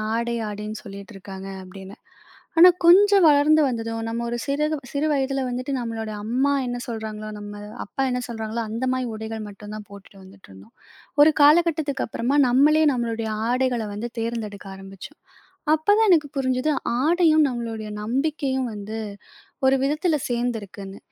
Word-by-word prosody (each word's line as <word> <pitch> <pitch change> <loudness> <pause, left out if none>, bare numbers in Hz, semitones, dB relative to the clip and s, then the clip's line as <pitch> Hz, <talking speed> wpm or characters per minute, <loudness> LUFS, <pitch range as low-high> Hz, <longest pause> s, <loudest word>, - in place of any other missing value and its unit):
ஆடை 235 0 -1
ஆடைன்னு 210 +1 -6
சொல்லிகிட்டு 200 +2 -10
இருக்காங்க 195 0 -9 0.2
அப்படின்னு. 190 +1 -11 0.6
ஆனா 360 +2 +10 0.2
கொஞ்சம் 395 +2 +7
வளர்ந்து 300 +1 +5
வந்ததும் 225 -2 -3
நம்ம 230 +1 -3
ஒரு 240 - -2
சிறு 290 +1 0 0.3
சிறு 285 +2 -1
வயதில 275 -1 0
வந்துட்டு 255 +3 -3
நம்மளோட 225 -2 -4
அம்மா 255 +6 +1
என்ன 245 0 -3
சொல்கிறாங்களோ, 220 -2 -5
நம்ம 205 0 -8 0.3
அப்பா 270 - -5
என்ன 250 0 -1
சொல்கிறாங்களோ 225 -1 -4
அந்த 230 +4 -3
மாரி 255 0 -1
உடைகள் 220 0 -6
மட்டு 205 +1 -11
தான் 215 -1 -8
போட்டுட்டு 200 0 -14
வந்துட்டு 190 - -17
இருந்தோம். 95 +4 -16 0.5
ஒரு 310 +1 +7
காலகட்டத்துக்கப்புறமா 290 -5 +2
நம்மளே 300 +5 +4
நம்மளுடைய 230 -2 -2 0.2
ஆடைகள 250 -3 0
வந்து 220 +4 -4
தேர்ந்தெடுக்க 220 -3 -4
ஆரம்பிச்சோம். 195 +8 -11 0.6
அப்ப 315 +3 -5
தான் 445 -1 +4
எனக்கு 310 -5 +4
புரிஞ்சது 260 +2 0 0.3
ஆடையும் 315 -1 +4
நம்மளுடைய 225 -3 -5
நம்பிக்கையும் 265 +1 -1
வந்து 210 +2 -6 0.7
ஒரு 265 0 +4
விதத்தில 305 +2 +1
சேந்திருக்குனு. 210 -5 -4
235 Hz, 140 wpm, -23 LUFS, 215-285 Hz, 0.7 s, ஆனா